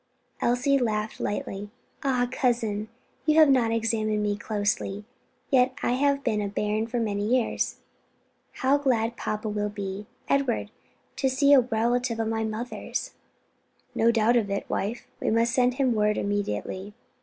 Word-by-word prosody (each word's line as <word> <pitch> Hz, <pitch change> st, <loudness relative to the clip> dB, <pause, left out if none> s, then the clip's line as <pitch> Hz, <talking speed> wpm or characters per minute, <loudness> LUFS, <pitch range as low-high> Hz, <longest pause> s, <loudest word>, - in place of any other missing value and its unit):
Elsie 260 Hz, +3 st, +2 dB
laughed 215 Hz, -3 st, -1 dB
lightly. 205 Hz, 0 st, -3 dB, 0.3 s
"Ah, 250 Hz, -3 st, +1 dB
cousin, 230 Hz, -5 st, 0 dB, 0.4 s
you 305 Hz, -, +4 dB
have 310 Hz, -3 st, +7 dB
not 240 Hz, -4 st, +3 dB
examined 220 Hz, -2 st, 0 dB
me 205 Hz, -1 st, 0 dB
closely 205 Hz, -1 st, -2 dB, 0.5 s
yet 255 Hz, -1 st, +4 dB
I -, -, +2 dB
have 280 Hz, +3 st, +3 dB
not 275 Hz, -, -13 dB
been 215 Hz, -3 st, +1 dB
a 205 Hz, -, -1 dB
bairn 210 Hz, +2 st, -1 dB
for 240 Hz, +1 st, -2 dB
many 205 Hz, -3 st, -1 dB
years. 240 Hz, +2 st, 0 dB, 0.8 s
How 275 Hz, +2 st, +2 dB
glad 235 Hz, -4 st, +1 dB
papa 215 Hz, -1 st, -3 dB
will 210 Hz, 0 st, -1 dB
be, 200 Hz, 0 st, -5 dB, 0.2 s
Edward, 275 Hz, -4 st, 0 dB, 0.5 s
to 265 Hz, -, +2 dB
see 280 Hz, +2 st, +4 dB
a 275 Hz, -, +9 dB
relative 240 Hz, 0 st, 0 dB
of 225 Hz, -1 st, 0 dB
my 225 Hz, 0 st, -1 dB
mother's!" 220 Hz, +3 st, -4 dB, 0.8 s
"No 230 Hz, -, +3 dB
doubt 230 Hz, +1 st, +4 dB
of 215 Hz, -4 st, 0 dB
it, 200 Hz, 0 st, -2 dB
wife, 215 Hz, +5 st, -2 dB
and -, -, 0 dB
we 225 Hz, -, +2 dB
must 235 Hz, +1 st, +1 dB
send 250 Hz, -1 st, +3 dB
him 260 Hz, -3 st, +2 dB
word 210 Hz, -1 st, +2 dB
immediately." 200 Hz, -, -3 dB
225 Hz, 160 wpm, -26 LUFS, 210-250 Hz, 0.8 s, a